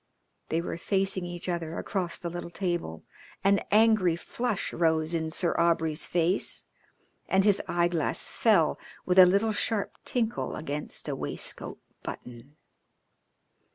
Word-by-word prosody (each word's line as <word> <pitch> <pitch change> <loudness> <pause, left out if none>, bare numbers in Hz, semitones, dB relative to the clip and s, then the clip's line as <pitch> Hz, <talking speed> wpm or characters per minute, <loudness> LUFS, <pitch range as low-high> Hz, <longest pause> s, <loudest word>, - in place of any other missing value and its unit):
They 165 - 0
were 170 - -5
facing 195 -1 +1
each 175 0 -6
other 170 -2 -3
across 180 -5 -2
the 170 - -5
little 175 0 -6
table. 175 - -3 0.4
An 200 +1 +4
angry 215 -5 +4
flush 230 +4 -3
rose 160 -1 +1
in 160 -1 -1
Sir 170 +2 +1
Aubrey's 165 -2 +1
face, 175 +2 0 0.6
and 190 0 +3
his 205 -1 +4
eyeglass 170 -2 +1
fell - - +2 0.3
with 185 +1 +4
a 185 - +10
little 200 +4 +2
sharp 215 -1 -1
tinkle 235 -3 -2
against 150 -1 -5
a - - -2
waistcoat - - -2 0.2
button. 125 +4 -9
175 Hz, 130 wpm, -28 LUFS, 165-195 Hz, 0.6 s, a